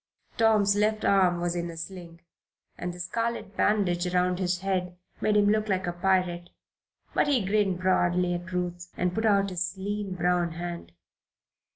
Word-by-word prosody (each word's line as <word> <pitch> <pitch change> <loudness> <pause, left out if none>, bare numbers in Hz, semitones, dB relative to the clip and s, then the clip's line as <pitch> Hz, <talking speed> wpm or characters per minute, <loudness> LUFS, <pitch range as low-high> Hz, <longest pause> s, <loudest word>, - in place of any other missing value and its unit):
Tom's 215 -3 +4
left 215 +1 +1
arm 185 -3 +3
was 175 0 -1
in 170 0 -2
a 165 - -9
sling, 170 -1 -8 0.5
and 180 - -4
the 175 - -11
scarlet 230 +2 -3
bandage 185 -5 +1
around 180 0 +1
his 180 -1 -1
head 180 -2 -2 0.2
made 210 -1 +2
him 205 - +4
look 215 +1 +1
like 190 -1 0
a 175 - -2
pirate; 175 -1 0 0.6
but - - +2
he 260 -8 +2
grinned 195 -2 +1
broadly 180 -1 +2
at 175 +1 -5
Ruth 180 0 -3
and 180 0 0
put 220 +2 0
out 200 -2 +3
his 180 +1 -3
lean 200 0 -3
brown 175 -1 +1
hand. 170 - -6
180 Hz, 170 wpm, -27 LUFS, 175-200 Hz, 0.6 s, Tom's